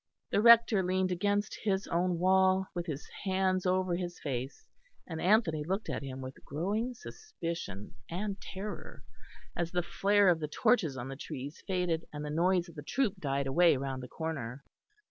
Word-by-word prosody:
The - - +3
Rector 230 -3 +7
leaned 185 0 +1
against 205 +3 0
his 195 -2 0
own 175 +1 0
wall, 190 +1 +4
with 175 0 -4
his 150 -2 -5 0.2
hands 185 -1 +1
over 185 -1 +1
his 175 -1 -4
face; 130 -2 -4 0.4
and 160 -2 -5
Anthony 180 -6 +3
looked 190 +7 -2
at - - -3
him 135 -1 -6
with 130 +1 -9
growing 210 - -2
suspicion 170 - -6 0.2
and 200 +3 -3
terror 205 +2 -7 0.5
as 170 -1 -1
the 175 0 0
flare 200 +2 +3
of 170 -2 +3
the 155 - -2
torches 175 - +2
on 120 0 -5
the 135 - -5
trees 145 +1 -7
faded, 180 -4 0
and 150 0 -5
the 150 - -4
noise 175 +3 +2
of 170 - -12
the 150 - -7
troop 215 - 0
died 140 -3 -1
away 160 +2 +4
round 135 -1 -3
the 125 - -7
corner. 140 -5 -5
175 Hz, 175 wpm, -31 LUFS, 150-190 Hz, 0.5 s, Rector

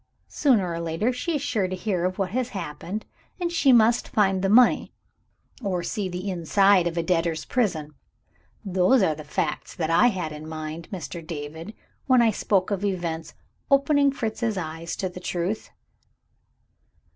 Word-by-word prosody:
Sooner 220 - +2
or 165 - -3
later, 170 +9 -1
she 320 +7 -2
is 285 - -2
sure 225 -10 0
to 185 - -3
hear 185 -2 -1
of 185 0 -2
what 190 -2 -1
has 250 +2 -1
happened 175 +6 -5 0.3
and 345 -1 -1
she 300 -5 +4
must 235 0 +4
find 195 -3 +2
the 195 - +1
money, 245 +4 +5 0.7
or 185 -5 -1
see 200 0 -2
the 180 +2 -5
inside 190 +1 +3
of 170 0 -4
a 170 - +1
debtor's 165 -2 0
prison. 160 -11 -1 0.7
Those 190 +5 +3
are 160 - +2
the 155 0 -9
facts 150 +1 -3
that 160 -1 -1
I 205 +9 +5
had 185 -8 -2
in 155 +1 -8
my 160 - -6
mind, 165 +1 -8
Mr. 175 -2 -6
David, 160 +5 -7 0.3
when 255 -2 +5
I 230 -2 +5
spoke 195 -1 0
of 200 -1 -1
events 170 -5 -3 0.3
opening 280 0 +4
Fritz's 225 -3 -2
eyes 165 -1 -4
to 190 - -2
the 180 0 -8
truth." 180 +4 -3
185 Hz, 170 wpm, -25 LUFS, 165-225 Hz, 0.7 s, money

